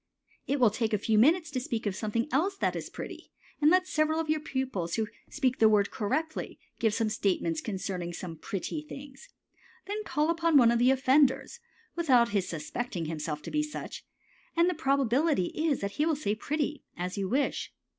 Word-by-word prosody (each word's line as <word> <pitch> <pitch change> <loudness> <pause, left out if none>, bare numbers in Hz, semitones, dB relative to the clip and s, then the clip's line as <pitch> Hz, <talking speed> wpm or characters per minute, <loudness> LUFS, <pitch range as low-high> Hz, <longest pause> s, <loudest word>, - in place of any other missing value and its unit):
It 280 +1 0
will 235 -4 +5
take 220 0 -1
a - - +4
few 215 +1 +2
minutes 315 +6 +4
to 260 - -1
speak 230 -3 -3
of 200 -2 -1
something 225 +4 -1
else 380 +8 +1
that - - 0
is - - -5
pretty, - - -8 0.3
and 300 - +6
let 365 +2 +4
several 310 0 +1
of 315 -1 0
your 310 - +1
pupils 260 - -2
who 220 - 0 0.2
speak 260 -4 0
the 220 - +7
word 205 -2 +3
correctly 305 +9 -2 0.2
give 220 -2 +2
some 225 -1 +1
statements 175 -6 0
concerning 185 -4 -4 0.3
pretty 200 - -3
things. 285 - -11 0.6
Then 415 +2 -3
call 305 -3 +1
upon 335 -2 +3
one 235 -3 +6
of 235 - +2
the 245 +2 +5
offenders, 270 - +3 0.4
without 255 -9 +4
his 200 -4 0
suspecting 170 +3 -4
himself 155 -1 -4
to - - -6
be 300 - +1
such, 300 0 -6 0.5
and 340 +1 +5
the 360 - +2
probability 275 - +2
is 310 -3 0
that 200 0 -2
he 310 - +3
will 320 - +2
say 210 -8 -1
"pretty," 295 +6 -2
as 180 +1 -3
you 195 -2 -2
wish. 275 +4 0
260 Hz, 190 wpm, -29 LUFS, 210-305 Hz, 0.6 s, the